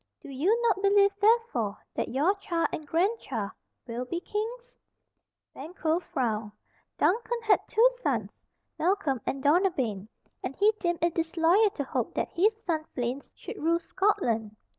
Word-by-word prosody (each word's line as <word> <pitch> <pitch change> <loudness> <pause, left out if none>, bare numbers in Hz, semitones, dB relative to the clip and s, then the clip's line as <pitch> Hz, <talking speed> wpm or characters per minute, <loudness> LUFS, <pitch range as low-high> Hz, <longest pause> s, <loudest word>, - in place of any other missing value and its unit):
Do - - -12
you 355 - +2
not 415 -5 +2
believe, 400 0 +5
therefore, 410 - +2 0.2
that - - -2
your 295 +10 +2
child 340 -4 -1
and 305 - -5
grandchild 325 - -1 0.3
will 235 +1 -4
be 340 +7 -3
kings?" 465 +6 -5 0.7
Banquo 320 +2 -2
frowned. 225 -10 -2 0.4
Duncan 470 +4 +1
had 435 -2 +4
two 460 +3 +5
sons, - - -3 0.3
Malcolm 315 - +1
and 270 0 -2
Donalbain, 285 - +1 0.3
and 270 - -4
he 415 +2 +4
deemed 345 -2 -1
it 340 -1 +2
disloyal 330 +5 +3
to 295 - -4
hope 260 - -3
that - - -1
his 425 +5 +1
son 320 -3 -1
Fleance 250 +2 -3
should 425 - -8
rule 335 +2 +3
Scotland. 285 - 0
335 Hz, 145 wpm, -28 LUFS, 270-410 Hz, 0.7 s, believe